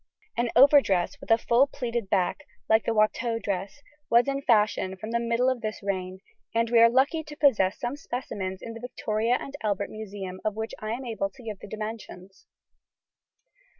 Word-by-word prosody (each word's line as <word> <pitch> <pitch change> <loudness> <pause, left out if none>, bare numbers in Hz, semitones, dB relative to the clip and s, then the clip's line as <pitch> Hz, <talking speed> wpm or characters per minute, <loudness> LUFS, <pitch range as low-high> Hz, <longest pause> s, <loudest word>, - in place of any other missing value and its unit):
An 240 0 0
overdress 270 -4 +5
with - - -11
a 225 - +6
full 240 +4 +3
pleated 235 -6 -4
back 195 +10 0 0.2
(like 220 0 +3
the - - +1
Watteau 225 +2 +1
dress) 200 +6 -4 0.3
was 235 +3 +5
in 275 0 -1
fashion 210 -6 +2
from 215 +4 -7
the 235 - +1
middle 235 +2 +1
of 260 -2 0
this 215 -1 -5
reign, 185 -1 -3 0.3
and 230 0 +1
we 235 - +6
are 230 0 +8
lucky 280 +6 +2
to 300 -1 -10
possess 215 -11 +3
some 245 +2 -3
specimens 200 -9 -5
in 230 - -6
the 230 - -8
Victoria 230 -1 -1
and 275 - -8
Albert 200 -2 -1
Museum 195 -3 -7
of 215 -1 -1
which 220 +1 -4
I 215 +1 -3
am 255 +3 -5
able 215 -4 -2
to 250 +5 -16
give 215 -4 -6
the - - -10
dimensions. 215 -3 -8
225 Hz, 185 wpm, -27 LUFS, 200-245 Hz, 0.3 s, are